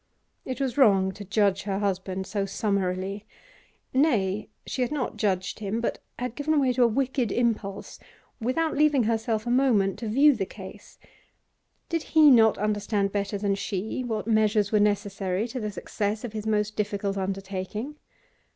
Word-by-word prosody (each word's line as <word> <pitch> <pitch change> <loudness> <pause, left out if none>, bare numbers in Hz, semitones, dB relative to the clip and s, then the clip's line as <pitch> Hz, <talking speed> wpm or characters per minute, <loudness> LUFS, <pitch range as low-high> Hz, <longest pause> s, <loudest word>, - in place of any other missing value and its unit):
It 255 - -4
was 270 -1 -1
wrong 195 -7 +5
to 205 +2 -9
judge 200 -1 +1
her 195 -1 -2
husband 190 -1 -2
so 200 0 -2
summarily; 195 0 -2 0.7
nay, 215 -8 +1 0.2
she 260 - -3
had 250 - 0
not 290 -5 -2
judged 190 -2 -1
him, 215 +2 -2
but 235 - -2 0.2
had 245 -2 -3
given 300 +3 +1
way 260 -2 +2
to 250 - 0
a 240 - +7
wicked 255 0 0
impulse, 215 -4 -2 0.4
without 310 +8 0
leaving 295 -3 +4
herself 220 0 -1
a 240 - -1
moment 240 -7 +2
to 230 - -4
view 280 +7 +5
the 195 -4 -2
case. 200 0 -11 0.9
Did 330 -1 -1 0.2
he 305 -2 +9
not 225 -3 +6
understand 205 -1 0
better 200 0 -2
than 200 0 0
she 200 +4 -3
what 220 -4 -3
measures 215 -2 +2
were 215 - +4
necessary 205 -1 0
to 255 +2 -4
the 215 -2 -3
success 205 +2 -3
of 235 -3 -6
his 215 0 -5
most 210 0 0
difficult 200 -1 -2
undertaking? 195 +7 -4
210 Hz, 165 wpm, -26 LUFS, 195-245 Hz, 0.9 s, he